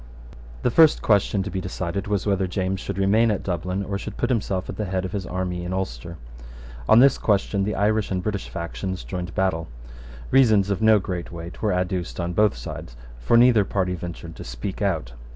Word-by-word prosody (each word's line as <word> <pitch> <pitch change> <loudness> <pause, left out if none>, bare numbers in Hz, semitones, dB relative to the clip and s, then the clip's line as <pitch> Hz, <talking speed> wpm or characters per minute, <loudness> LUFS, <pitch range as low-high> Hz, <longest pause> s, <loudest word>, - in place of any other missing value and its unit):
The 125 - +2
first 160 +3 +5
question 100 -2 +2
to 100 - -5
be 95 - -3
decided 90 +1 -4
was 100 -2 -1
whether 100 -2 +1
James 95 +1 -2
should 100 0 -5
remain 105 +4 +3
at 105 - -1
Dublin, 90 +2 -2
or 100 0 -3
should - - -7
put - - 0
himself 100 -5 -1
at - - -5
the 105 - -2
head 95 -1 -2
of 95 - -5
his 100 -4 -4
army 90 -1 -3
in 90 +1 -4
Ulster. 85 -2 -4 0.7
On - - +7
this 135 +1 +5
question 100 -1 +1
the 105 - -2
Irish 105 +1 +1
and 95 -1 -2
British 105 -1 -3
factions 95 +2 -5
joined 90 -2 -5
battle. 85 -4 0 0.6
Reasons 110 -7 +4
of 100 - -1
no 110 -1 +6
great 90 -4 -4
weight 85 0 -8
were 105 - +1
adduced 90 -8 -2
on 85 0 -2
both 105 -6 +3
sides; - - -8 0.2
for 90 - +3
neither 120 -3 +6
party 95 -2 -1
ventured 85 -1 -7
to - - -7
speak - - -6
out. 80 -12 -1
95 Hz, 205 wpm, -24 LUFS, 90-105 Hz, 0.7 s, On